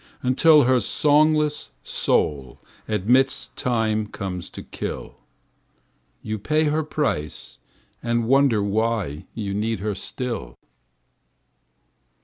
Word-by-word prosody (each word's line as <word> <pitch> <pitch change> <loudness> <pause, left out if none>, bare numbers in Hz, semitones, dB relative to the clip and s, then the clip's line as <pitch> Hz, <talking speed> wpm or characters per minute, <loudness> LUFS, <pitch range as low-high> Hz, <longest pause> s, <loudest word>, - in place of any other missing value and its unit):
Until 145 +4 +5
her 130 0 +4
songless 150 - +2
soul 70 -4 0 0.3
admits 125 +6 +2
Time 110 -3 0
comes 95 -4 -5
to - - -9
kill; - - -6 1.0
You 110 -1 -3
pay 155 +9 +1
her 155 +1 +1
price 145 - -3 0.4
and 120 -1 0
wonder 135 -5 +4
why 100 -7 -1
You 100 -3 -3
need 110 +1 -1
her 105 0 -1
still. 105 - -4
115 Hz, 100 wpm, -23 LUFS, 100-140 Hz, 1.0 s, Until